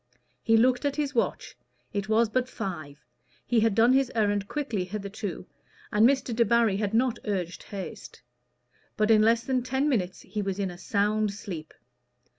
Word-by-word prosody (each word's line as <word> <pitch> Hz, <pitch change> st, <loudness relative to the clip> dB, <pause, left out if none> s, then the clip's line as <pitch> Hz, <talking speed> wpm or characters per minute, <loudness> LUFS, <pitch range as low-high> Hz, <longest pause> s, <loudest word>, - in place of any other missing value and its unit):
He 225 Hz, -1 st, +4 dB
looked 250 Hz, +3 st, +3 dB
at 285 Hz, -1 st, 0 dB
his 290 Hz, -1 st, -2 dB
watch: 235 Hz, -, -1 dB, 0.4 s
it 200 Hz, 0 st, -3 dB
was 225 Hz, +1 st, +4 dB
but 255 Hz, +3 st, -1 dB
five; 155 Hz, -, -6 dB, 0.4 s
he 240 Hz, -, +2 dB
had 220 Hz, -2 st, +2 dB
done 230 Hz, +3 st, +5 dB
his 270 Hz, -1 st, +2 dB
errand 205 Hz, -2 st, +1 dB
quickly 250 Hz, -10 st, -2 dB
hitherto, 200 Hz, 0 st, -5 dB, 0.5 s
and 215 Hz, +4 st, +5 dB
Mr. 265 Hz, -4 st, 0 dB
Debarry 230 Hz, -3 st, +3 dB
had 210 Hz, +1 st, -1 dB
not 240 Hz, 0 st, +2 dB
urged 185 Hz, -5 st, -3 dB
haste. 195 Hz, -2 st, -8 dB, 0.7 s
But 215 Hz, +1 st, +3 dB
in 215 Hz, -1 st, +6 dB
less 230 Hz, +2 st, +3 dB
than 255 Hz, +1 st, 0 dB
ten 265 Hz, +3 st, 0 dB
minutes 190 Hz, -10 st, -1 dB
he 210 Hz, +2 st, -4 dB
was 195 Hz, -1 st, -3 dB
in 195 Hz, -3 st, -2 dB
a 175 Hz, -, -10 dB
sound 210 Hz, +1 st, +1 dB
sleep. 170 Hz, -7 st, -7 dB
215 Hz, 170 wpm, -27 LUFS, 200-240 Hz, 0.7 s, in